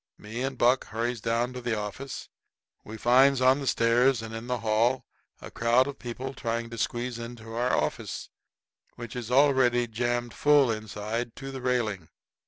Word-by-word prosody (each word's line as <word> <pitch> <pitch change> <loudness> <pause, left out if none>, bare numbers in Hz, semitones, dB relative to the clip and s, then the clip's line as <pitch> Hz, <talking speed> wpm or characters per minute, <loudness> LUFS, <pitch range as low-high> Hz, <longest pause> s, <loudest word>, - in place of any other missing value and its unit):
Me 110 +4 -6
and 135 0 -2
Buck 125 +2 +3
hurries 115 +1 -3
down 115 +3 0
to 125 - -6
the 120 -2 -1
office. 105 +6 -6 0.6
We 110 +1 -8
finds 130 +4 +5
on 130 +2 +4
the 140 - -5
stairs 120 +1 +3
and 110 0 -7
in 115 +1 -6
the 125 -2 -2
hall 115 +4 +1 0.3
a - - -10
crowd 120 +3 +3
of 140 0 -7
people 130 +2 -5
trying 115 -2 -3
to 115 - -7
squeeze 120 +2 -2
into 115 -1 -8
our 120 +2 +1
office, - - -3 0.7
which 120 -1 -8
is 120 -2 -5
already 130 -2 +4
jammed 120 +1 -2
full 145 -4 +4
inside 110 +2 -4
to 135 +1 -7
the 135 -1 -6
railing. 115 -9 -1
120 Hz, 175 wpm, -27 LUFS, 115-130 Hz, 0.7 s, finds